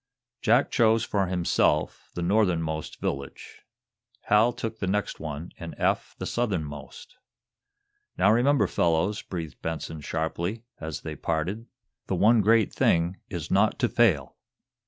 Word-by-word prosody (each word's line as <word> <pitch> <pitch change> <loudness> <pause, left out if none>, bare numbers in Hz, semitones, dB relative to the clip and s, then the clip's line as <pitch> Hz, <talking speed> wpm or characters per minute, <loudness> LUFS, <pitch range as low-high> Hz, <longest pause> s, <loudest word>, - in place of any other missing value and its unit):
Jack 120 +5 +3
chose, 115 -1 +3
for 100 -3 0
himself, 90 -1 0
the 85 - -2
northernmost 85 -5 0
village. 70 0 -5 0.6
Hal 105 +3 +4
took 115 -1 -5
the 95 - -2
next 105 +1 -1
one, 75 +2 -6
and 85 -1 -7
Eph - - 0
the - - -5
southernmost. 80 - -4 1.0
"Now, - - +5
remember, 125 +1 +3
fellows," 90 +4 +1
breathed 80 -5 -7
Benson, 80 -1 -4
sharply, 85 +8 -3 0.2
as 80 -2 -5
they - - -6
parted, 90 +9 -2 0.4
"the 95 - 0
one 110 +5 +5
great 110 +1 +3
thing 85 +3 +2
is 85 -5 -5
not 100 +3 +3
to 130 - +2
fail!" 105 - +2
95 Hz, 135 wpm, -26 LUFS, 80-110 Hz, 1.0 s, Now